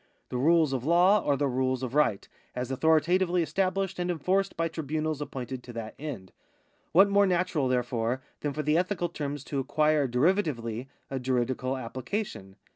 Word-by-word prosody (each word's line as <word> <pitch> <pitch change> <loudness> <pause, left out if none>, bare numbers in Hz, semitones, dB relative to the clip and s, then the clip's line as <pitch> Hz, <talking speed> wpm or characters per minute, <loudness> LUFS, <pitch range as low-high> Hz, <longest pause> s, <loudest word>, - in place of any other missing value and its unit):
The 125 - -3
rules 155 +1 +3
of 130 -2 -2
law 180 +7 +4
are 140 -1 +1
the 145 - +1
rules 130 0 0
of 125 -1 -4
right, 145 -9 +2 0.3
as 125 +1 -3
authoritatively 170 +5 +3
estabhshed 195 +1 -1
and 175 0 -1
enforced 185 +4 0
by 165 0 +1
tribunals 155 -1 -3
appointed 130 -3 -5
to 120 0 -11
that 115 -1 -6
end. 135 -11 -6 0.6
What 195 +4 +7
more 200 0 +4
natural, 175 -6 +1
therefore, 125 0 -1 0.2
than 145 - -2
for 150 +2 -3
the 150 +3 +3
ethical 180 -1 -1
terms 145 -3 -4
to 140 - -3
acquire 150 +1 +2
derivatively 125 - 0 0.2
a 135 - -2
juridical 130 +1 -1
application 130 - -5
145 Hz, 165 wpm, -28 LUFS, 130-175 Hz, 0.6 s, What